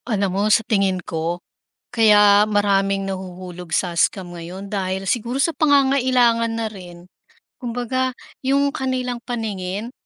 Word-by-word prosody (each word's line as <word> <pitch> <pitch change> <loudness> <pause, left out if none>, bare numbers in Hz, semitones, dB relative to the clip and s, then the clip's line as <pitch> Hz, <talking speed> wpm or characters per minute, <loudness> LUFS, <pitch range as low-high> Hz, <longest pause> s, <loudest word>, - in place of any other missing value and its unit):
Alam 200 -4 0
mo 195 - 0
sa 220 +1 +3
tingin 195 -3 +1
ko, 165 +2 -2 0.5
kaya 210 -3 +5
maraming 195 -2 +1
nahuhulog 180 -2 -7
sa 175 0 0
scam 175 -1 0
ngayon 185 +4 -8
dahil 190 -1 -2
siguro 240 +4 -1
sa 315 0 0
pangangailangan 255 -5 +3
na 225 -1 -2
rin. 180 -3 -12 0.5
Kumbaga 250 +1 -2 0.2
yung 280 +1 +1
kanilang 255 -2 -2
paningin, 220 -2 -4
210 Hz, 125 wpm, -21 LUFS, 190-245 Hz, 0.5 s, kaya